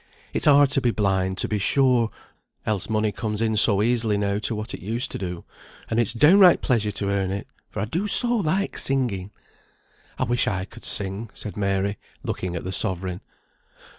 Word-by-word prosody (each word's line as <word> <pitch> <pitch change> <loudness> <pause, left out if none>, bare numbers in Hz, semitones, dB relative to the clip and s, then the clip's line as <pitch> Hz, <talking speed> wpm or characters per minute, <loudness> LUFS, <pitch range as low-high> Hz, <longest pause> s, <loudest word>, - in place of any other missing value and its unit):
It's - - +1
hard 145 -1 +5
to 135 - +3
be 125 - +1
blind, 95 -4 0
to - - -1
be 105 - -2
sure, 125 +1 +3 0.6
else 105 -2 -2
money 110 -1 0
comes 105 +1 -4
in 110 -1 0
so 105 -1 +6
easily 115 -3 +1
now 100 0 -1
to 110 +2 -2
what 105 +2 -6
it - - -6
used 115 +7 -1
to - - -5
do; 90 -3 -5 0.5
and 115 - +1
it's 115 -1 +2
downright 175 - +5
pleasure 115 -5 +1
to 100 0 -3
earn 100 -1 -1
it, 100 +1 -4 0.2
for - - -5
I - - -1
do 170 - -3
so 240 +3 +4
like 195 +1 -1
singing." 120 -9 -1 0.9
"I - - -1
wish 120 0 +1
I 95 -2 -2
could - - -12
sing," 100 +3 0
said 105 - -7
Mary, 100 0 -1 0.2
looking 90 -1 -4
at 85 - -5
the 95 - -5
sovereign. 95 -2 -1
105 Hz, 195 wpm, -23 LUFS, 100-125 Hz, 0.9 s, so